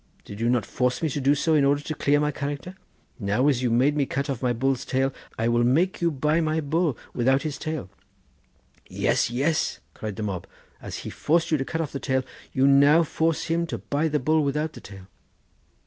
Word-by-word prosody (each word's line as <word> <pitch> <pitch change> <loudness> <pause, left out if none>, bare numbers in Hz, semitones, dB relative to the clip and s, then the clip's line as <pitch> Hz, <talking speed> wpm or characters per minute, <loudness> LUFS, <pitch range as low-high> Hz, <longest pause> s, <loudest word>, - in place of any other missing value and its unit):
Did 100 - -9
you 115 - +2
not 120 -3 +1
force 125 +4 -1
me 160 - +2
to 145 +1 -3
do 140 +2 +4
so 160 +3 +1
in 150 -2 +4
order 140 +1 +3
to 155 - -3
clear 145 0 +2
my 150 0 +1
character? 145 +5 -5 0.5
Now 105 +6 +1
as 135 -4 +2
you 125 - +1
made 130 +6 +3
me 140 -2 +1
cut 140 +1 -2
off 130 - -5
my 125 -2 +1
bull's 130 +2 0
tail, 135 +1 0 0.2
I 115 - 0
will 120 0 +2
make 165 +12 +2
you 170 - +3
buy 150 +2 +1
my 155 0 0
bull 155 -1 0 0.2
without 130 +3 +2
his 150 -2 -4
tail.' 155 - -4 1.0
'Yes, - - +1
yes,' 140 +7 0
cried 105 -2 -6
the 110 - -4
mob; 95 -4 -4 0.3
'as - - -6
he - - -5
forced 165 +2 +1
you 155 - +4
to 135 - -2
cut 160 - -2
off 150 - -4
the 140 - -4
tail, 130 -1 0
do 130 - -18 0.3
you 130 0 +3
now 140 +4 +6
force 160 0 0
him 170 +1 -1
to - - -4
buy 145 +3 -1
the 150 -1 +1
bull 155 +3 +2
without 150 +3 -1
the - - -11
tail. 95 -2 -11
140 Hz, 225 wpm, -25 LUFS, 125-155 Hz, 1.0 s, now